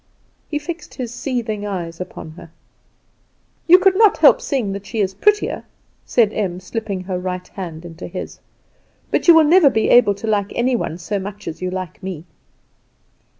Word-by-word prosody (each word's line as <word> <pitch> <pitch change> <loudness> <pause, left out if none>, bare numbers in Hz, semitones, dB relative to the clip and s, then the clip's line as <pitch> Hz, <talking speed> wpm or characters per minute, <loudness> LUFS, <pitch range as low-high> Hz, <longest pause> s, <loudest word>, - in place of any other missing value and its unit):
He 295 - -1
fixed 310 +1 -7
his 245 -3 -5
seething 235 -5 -3
eyes 175 -4 -5
upon 180 -3 -8
her. 165 +1 -13 1.2
"You 355 +2 +9
could 375 0 +3
not 430 0 +5
help - - +6
seeing 250 -9 -1
that 200 0 -7
she 225 - -4
is 195 -2 0
prettier," 420 - +1 0.4
said 220 -3 +3
Em, 185 -4 -2
slipping 200 0 -4
her 185 -1 -3
right 180 0 -4
hand 170 -4 -7
into 165 -1 -8
his; - - -7 0.7
"but - - 0
you 340 - +9
will 320 - +7
never 320 0 +6
be 220 -4 0
able 225 -5 +6
to 200 - -8
like 205 -2 0
any 245 +1 +1
one 165 -7 -3
so 200 +4 -3
much 205 +1 -8
as 160 - -6
you 185 - -2
like 185 -2 -6
me." 180 -4 -6
205 Hz, 180 wpm, -20 LUFS, 185-255 Hz, 1.2 s, You